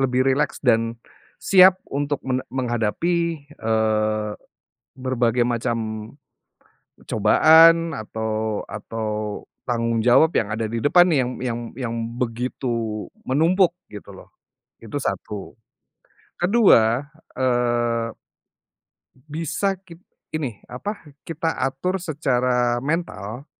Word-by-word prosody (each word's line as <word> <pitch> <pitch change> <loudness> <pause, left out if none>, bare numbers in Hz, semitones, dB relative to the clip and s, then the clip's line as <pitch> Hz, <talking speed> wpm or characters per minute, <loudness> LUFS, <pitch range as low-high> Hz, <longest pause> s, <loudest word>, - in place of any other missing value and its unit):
lebih 130 -1 +2
rileks, 145 +3 0
dan, 115 -1 +2 0.4
siap 185 -1 +6
untuk 145 0 -2
men 130 -1 0
menghadapi, 140 +7 -1 0.2
eee, 110 -1 0 0.7
berbagai 125 -2 +1
macam 120 0 -1 1.3
cobaan 160 +9 +6
atau 110 0 -3
atau 110 -2 -4 0.2
tanggung 115 -2 0
jawab 135 +6 +6
yang 105 - 0
ada 110 +1 -2
di 115 0 -3
depan 175 +4 +5
nih 155 - +3
yang 125 - -4
yang 120 -2 -2 0.2
yang 120 -3 -3 0.2
begitu 115 -2 -3 0.2
menumpuk 170 +6 +3 0.2
gitu 105 -1 -10
loh, - - -14 0.5
itu - - -5
1. 105 -2 -4 0.8
Ke-2, 145 - +4 0.3
eee, 120 -2 0 1.2
bisa 165 +6 -1
kit 170 -3 -14 0.3
ini, 135 -10 -4
apa, 155 - -6 0.2
kita 165 0 -2
atur 180 +9 -1
secara 125 -7 0
mental. 140 - -3
125 Hz, 100 wpm, -22 LUFS, 115-155 Hz, 1.3 s, siap